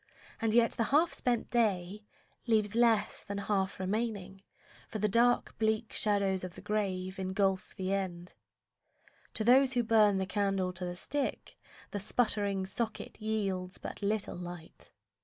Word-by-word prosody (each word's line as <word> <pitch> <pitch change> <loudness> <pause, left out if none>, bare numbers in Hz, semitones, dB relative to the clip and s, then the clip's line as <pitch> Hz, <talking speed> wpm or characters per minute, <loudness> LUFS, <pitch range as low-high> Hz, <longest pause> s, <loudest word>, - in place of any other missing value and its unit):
and 225 -1 +1
yet 235 -1 +5
the 230 - 0
half 305 +8 +3
spent 240 -2 -1
day 210 -3 0 0.4
Leaves 215 -3 +2
less 230 -2 +3
than 200 -1 -6
half 195 -2 -1
remaining, 195 -1 -3 0.5
for - - -4
the 210 - +1
dark, 235 +4 +3
Bleak 220 0 0
shadows 200 -3 +1
of 185 -1 -6
the - - -10
grave 190 -3 -2
engulf 190 0 0
the 190 +1 -2
end. 180 -3 -3 1.0
To 220 - +2
those 260 +3 +5
who 245 -1 +2
burn 215 -3 +4
the 190 - 0
candle 195 -2 0
to 180 0 -4
the 175 0 -4
stick, 285 +9 -3 0.4
The 205 - -3
sputtering 200 -2 0
socket 220 +2 -4
yields 195 -4 -2
but - - -8
little 205 +1 -1
light. 175 -2 -9
205 Hz, 150 wpm, -31 LUFS, 190-225 Hz, 1.0 s, yet